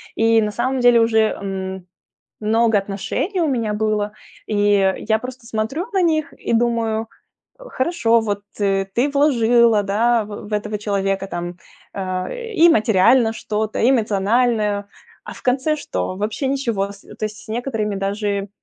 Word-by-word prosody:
И 225 0 +4
на 210 -1 -1
самом 255 +4 -1
деле 245 -1 +5
уже, 225 -1 +3
м, 190 -3 -2 0.6
много 225 +1 +2
отношений 200 - -3
у 320 - +2
меня 230 -5 -1
было. 210 -1 0 0.4
И 205 -2 +2
я 220 0 +3
просто 250 0 -9
смотрю 225 - -2
на 380 - +3
них 315 -3 0
и - - -4
думаю: 230 -1 +1 0.5
"Хорошо, 260 - +1
вот 205 -2 -2 0.2
ты 195 +7 0
вложила, 235 -6 +4
да, 225 +4 +2
в 205 0 -9
в - - -11
этого 210 0 -2
человека 195 -1 -1
там, 175 -1 -5 0.4
э, 195 - -4
и 340 -1 +6
материально 225 - +4
что-то, 215 -1 -3
и 245 - +4
эмоциональное, 215 -2 +1 0.4
а - - -7
в - - -13
конце 265 +5 +1
что? 290 -10 -4
Вообще 215 +7 -2
ничего". 230 -8 -1
С 200 - -16 0.2
то 215 - -4
есть 215 0 -5
с - - -20
некоторыми 225 -4 -2
даже, 200 0 -2
220 Hz, 150 wpm, -20 LUFS, 205-245 Hz, 0.6 s, и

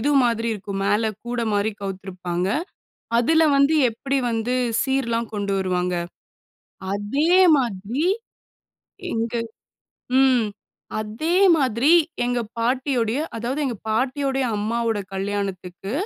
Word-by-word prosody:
இது 285 - +1
மாதிரி 230 -1 0
இருக்கும். 200 -1 -5
மேல 205 +3 +2 0.2
கூட 240 0 -2
மாரி 205 +1 +1
கவித்திருப்பாங்க. 185 -2 -3 0.7
அதில 320 +7 +3 0.2
வந்து, 280 +3 +4 0.2
எப்படி 270 +5 -2
வந்து 225 +2 -1 0.3
சீர்லாம் 235 -4 0
கொண்டு 200 -1 -2
வருவாங்க, 180 -1 0 1.0
அதே 270 +11 0 0.3
மாதிரி. 235 - -1 1.1
எங்க 225 +1 -2 0.9
ம். 255 -4 +4 0.5
அதே 225 +12 -2 0.2
மாதிரி, 260 +1 +2 0.3
எங்க 245 0 0 0.2
பாட்டியுடைய 250 0 0 0.2
அதாவது 245 +6 -2
எங்க 250 -4 -2
பாட்டியுடைய 265 +4 0
அம்மாவோட 225 +1 -1
கல்யாணத்துக்கு 195 -1 -4
230 Hz, 100 wpm, -23 LUFS, 205-260 Hz, 1.1 s, வந்து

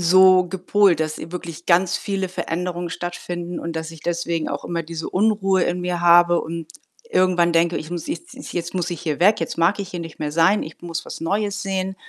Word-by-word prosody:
so 185 +1 +6
gepolt, 190 0 +2
dass 155 -1 -2
wirklich 170 0 -7
ganz 180 +1 +3
viele 195 -2 -2
Veränderungen 175 -1 -3
stattfinden 175 0 -5
und 165 0 -5
dass 160 0 -4
ich 165 - -12
deswegen 170 -1 -2
auch - - -4
immer 170 -1 -2
diese 165 0 -6
Unruhe 195 -2 +2
in 180 0 -1
mir 180 -1 -2
habe 175 0 +6
und 165 0 -5 0.4
irgendwann 180 - +3
denke, 170 +1 +3
ich 155 - -8
muss 175 -2 -4
jetzt 330 -2 -6 0.2
jetzt 170 0 -4
muss 180 -1 -1
ich 170 - -4
hier 155 -3 -3
weg, 205 +2 +5
jetzt 165 - -3
mag 170 +5 +3
ich 195 - -6
hier 175 - -5
nicht 165 -1 -9
mehr 150 -1 -3
sein, 170 +6 +4
ich 155 - -9
muss 170 0 -4
was - - -7
Neues 200 +4 -1
sehen. 190 -1 -2
175 Hz, 210 wpm, -22 LUFS, 165-185 Hz, 0.4 s, so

